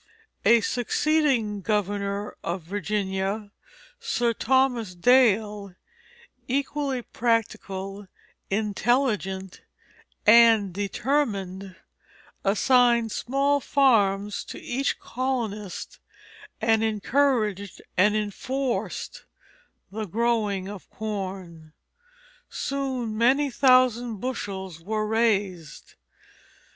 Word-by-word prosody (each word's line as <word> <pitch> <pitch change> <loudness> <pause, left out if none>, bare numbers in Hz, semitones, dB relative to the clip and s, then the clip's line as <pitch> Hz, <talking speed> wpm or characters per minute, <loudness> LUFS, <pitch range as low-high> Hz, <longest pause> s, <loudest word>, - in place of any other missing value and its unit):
A 230 +2 +6
succeeding 245 -3 +1
governor 205 +1 -2
of 175 +1 -3
Virginia, 200 +2 -2 0.5
Sir 245 - 0
Thomas 245 -5 +1
Dale, 210 -3 +3 0.7
equally 275 -1 -1
practical, 200 -4 -2 0.4
intelligent, 205 -2 -1 0.6
and 225 -3 +6
determined, 200 -3 -2 0.7
assigned 235 +2 +3
small 275 +5 +1
farms 210 -8 +2
to - - -8
each 270 +3 -2
colonist, 230 -6 -4 0.6
and 225 0 +2
encouraged 215 -3 0 0.2
and 205 +3 +4
enforced 245 +5 -3 0.7
the 215 +1 -4
growing 210 -2 0
of 200 -2 -9
corn. 185 -7 -6 0.8
Soon 260 -5 -3
many 265 +5 +3
thousand 250 -3 +3
bushels 190 -7 -5
were 215 +4 -2
raised. 205 -7 -1
215 Hz, 75 wpm, -25 LUFS, 195-245 Hz, 0.8 s, A